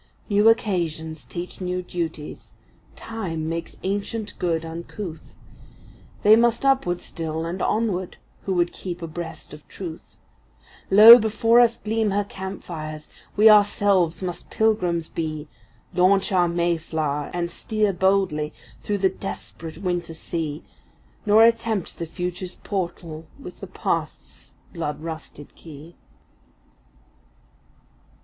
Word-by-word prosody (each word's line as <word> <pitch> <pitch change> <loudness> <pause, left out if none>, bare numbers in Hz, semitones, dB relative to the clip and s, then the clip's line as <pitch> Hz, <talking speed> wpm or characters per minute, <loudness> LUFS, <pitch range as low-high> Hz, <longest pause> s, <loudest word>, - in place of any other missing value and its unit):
New 205 +2 +5
occasions 165 -8 -1
teach 175 +2 -7
new 180 0 -2
duties; 165 -4 -6 0.4
Time 180 -9 -4
makes 165 +1 -4
ancient 205 +3 -3
good 165 -2 0
uncouth; 165 +1 -8 0.9
They 210 +1 +8
must 235 +2 +2
upward 220 -11 +2
still, 160 0 -4
and 175 +3 -4
onward, 205 -5 -1 0.3
who 195 - 0
would 175 0 +1
keep 175 -2 -6
abreast 165 0 -7
of 150 0 -13
Truth; 170 -4 -9 0.7
Lo, 220 +5 +11
before 225 +2 +3
us 235 -1 +4
gleam 220 0 0
her 205 +1 +1
camp 190 -1 -7
fires! 155 -2 -7 0.3
we 215 +2 +7
ourselves 200 -5 +4
must 175 -1 -5
Pilgrims 180 -7 +1
be, 155 -2 -4 0.5
Launch 185 +3 +3
our 180 -2 +3
Mayflower, 160 -4 -1
and 170 -1 -2
steer 215 -2 0
boldly 185 -5 +1 0.3
through 205 - -1
the 195 -1 +3
desperate 170 -4 -7
winter 175 -3 -2
sea, 160 -1 -4 0.6
Nor 215 +2 +7
attempt 230 -4 0
the 170 - -3
Future’s 180 +1 -5
portal 170 -4 -5
with - - -10
the - - -7
Past’s - - -4 0.2
blood 160 -4 -3
rusted 160 -3 -8
key. 160 +1 -12
180 Hz, 120 wpm, -24 LUFS, 165-205 Hz, 0.9 s, Lo